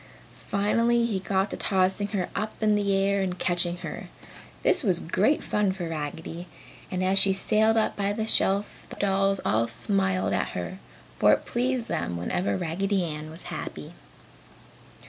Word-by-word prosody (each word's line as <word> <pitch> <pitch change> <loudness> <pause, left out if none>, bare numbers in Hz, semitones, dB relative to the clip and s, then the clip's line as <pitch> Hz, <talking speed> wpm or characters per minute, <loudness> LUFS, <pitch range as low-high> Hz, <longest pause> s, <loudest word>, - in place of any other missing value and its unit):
Finally 230 +4 +2
he 210 -5 -1
got 190 +1 0
to - - -3
tossing 190 +1 +1
her 200 -4 -2
up 215 +2 -3
in 215 -1 +4
the 205 -1 +1
air 200 0 +1
and 185 -1 -2
catching 175 -1 0
her. - - -7 0.5
This - - +4
was 185 - +3
great 205 - +1
fun 210 -2 +1
for 180 -3 -5
Raggedy 165 +2 -5 0.4
and 185 0 -2
as 190 +1 +4
she 195 - +5
sailed 220 +3 +3
up 220 - +1
by 200 0 0
the 220 +1 -2
shelf 200 -2 +1
the - - -8
dolls 195 0 +1
all 115 +2 +2
smiled 190 - 0
at - - -1
her, - - -5 0.4
for - - +6
it - - -1
pleased 245 -1 -1
them 85 - -2
whenever 175 - -1
Raggedy 190 +3 -1
Ann 155 -2 -5
was 160 +2 -9
happy. - - -6
195 Hz, 165 wpm, -26 LUFS, 180-210 Hz, 0.5 s, for